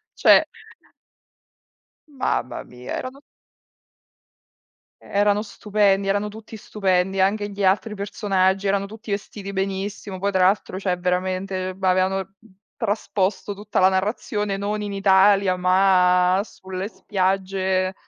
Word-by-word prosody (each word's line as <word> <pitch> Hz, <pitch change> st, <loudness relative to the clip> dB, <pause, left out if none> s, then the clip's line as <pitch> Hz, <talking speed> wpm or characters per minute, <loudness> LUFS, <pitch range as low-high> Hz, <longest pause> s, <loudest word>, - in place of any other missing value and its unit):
Cioè -, -, +6 dB, 1.6 s
Mamma 270 Hz, -, -2 dB
mia 125 Hz, 0 st, -8 dB
erano 265 Hz, +2 st, -7 dB, 1.8 s
erano 205 Hz, +1 st, +1 dB
stupendi, 200 Hz, -1 st, +1 dB
erano 205 Hz, +1 st, 0 dB
tutti 220 Hz, +1 st, -10 dB
stupendi, 195 Hz, -2 st, 0 dB
anche 205 Hz, +2 st, +1 dB
gli 200 Hz, 0 st, -3 dB
altri 210 Hz, +3 st, +1 dB
personaggi 195 Hz, -1 st, 0 dB
erano 200 Hz, 0 st, +1 dB
tutti 220 Hz, +1 st, -11 dB
vestiti 200 Hz, 0 st, -5 dB
benissimo, 195 Hz, 0 st, -4 dB
poi 200 Hz, -, 0 dB
tra 190 Hz, -2 st, +1 dB
l'altro 190 Hz, 0 st, +1 dB
cioè 185 Hz, -2 st, -1 dB
veramente, 185 Hz, +1 st, -2 dB
ehm, 185 Hz, -, -11 dB
b -, -, -18 dB
avevano 185 Hz, +1 st, +2 dB
t -, -, -30 dB, 0.5 s
trasposto 205 Hz, -2 st, -1 dB
tutta 205 Hz, +1 st, -2 dB
la 185 Hz, -, +6 dB
narrazione 205 Hz, +1 st, -1 dB
non 205 Hz, +2 st, -2 dB
in 205 Hz, -1 st, -4 dB
Italia 195 Hz, -1 st, +4 dB
ma 180 Hz, 0 st, +3 dB
sulle 190 Hz, -2 st, -7 dB
spiagge 190 Hz, -1 st, -1 dB
195 Hz, 120 wpm, -22 LUFS, 185-205 Hz, 1.8 s, Cioè